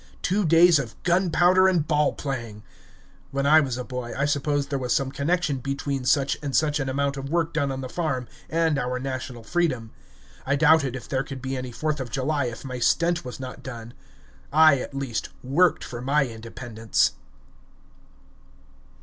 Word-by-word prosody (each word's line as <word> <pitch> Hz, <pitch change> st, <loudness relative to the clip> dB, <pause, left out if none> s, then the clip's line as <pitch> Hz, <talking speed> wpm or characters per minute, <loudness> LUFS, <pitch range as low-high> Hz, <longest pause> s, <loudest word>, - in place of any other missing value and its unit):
Two 195 Hz, +2 st, +1 dB
days 165 Hz, 0 st, +6 dB
of 120 Hz, -5 st, -5 dB
gunpowder 180 Hz, +1 st, +4 dB
and 170 Hz, -5 st, +1 dB
ball 150 Hz, -2 st, +2 dB
playing! 115 Hz, -7 st, -5 dB, 0.7 s
When 140 Hz, 0 st, -2 dB
I 155 Hz, +2 st, +7 dB
was 130 Hz, -5 st, -1 dB
a 125 Hz, -, -3 dB
boy, 125 Hz, -1 st, -6 dB
I 140 Hz, -, +1 dB
supposed 145 Hz, 0 st, 0 dB
there 140 Hz, -, 0 dB
was 125 Hz, -2 st, 0 dB
some 135 Hz, -1 st, 0 dB
connection 150 Hz, +1 st, 0 dB
between 135 Hz, 0 st, -3 dB
such 140 Hz, +1 st, +2 dB
and 140 Hz, -3 st, -3 dB
such 155 Hz, -1 st, +2 dB
an 135 Hz, -1 st, -2 dB
amount 140 Hz, +1 st, -1 dB
of 135 Hz, 0 st, -5 dB
work 165 Hz, 0 st, 0 dB
done 140 Hz, -3 st, 0 dB
on 135 Hz, 0 st, -4 dB
the 130 Hz, -, -5 dB
farm 135 Hz, -5 st, -2 dB, 0.2 s
and 160 Hz, -3 st, +1 dB
our 125 Hz, 0 st, -2 dB
national 130 Hz, -2 st, -5 dB
freedom. 130 Hz, -7 st, -1 dB, 0.5 s
I 140 Hz, -, +1 dB
doubted 150 Hz, -3 st, +4 dB
if 130 Hz, -, -8 dB
there 130 Hz, -, 0 dB
could 135 Hz, -1 st, -7 dB
be 130 Hz, +1 st, -4 dB
any 130 Hz, -1 st, -5 dB
Fourth 150 Hz, +4 st, -2 dB
of 130 Hz, -2 st, -4 dB
July 140 Hz, +2 st, -1 dB
if 120 Hz, +2 st, -6 dB
my 130 Hz, -1 st, -5 dB
stent 170 Hz, +7 st, +2 dB
was 125 Hz, +1 st, -8 dB
not 130 Hz, -1 st, -7 dB
done. 120 Hz, -2 st, -8 dB, 0.6 s
I, 155 Hz, -2 st, +6 dB
at 135 Hz, -, -7 dB
least, 135 Hz, -4 st, -3 dB
worked 165 Hz, +8 st, +2 dB
for 120 Hz, -1 st, -7 dB
my 140 Hz, +2 st, +2 dB
Independence. 115 Hz, -1 st, -1 dB
140 Hz, 180 wpm, -25 LUFS, 125-155 Hz, 0.7 s, I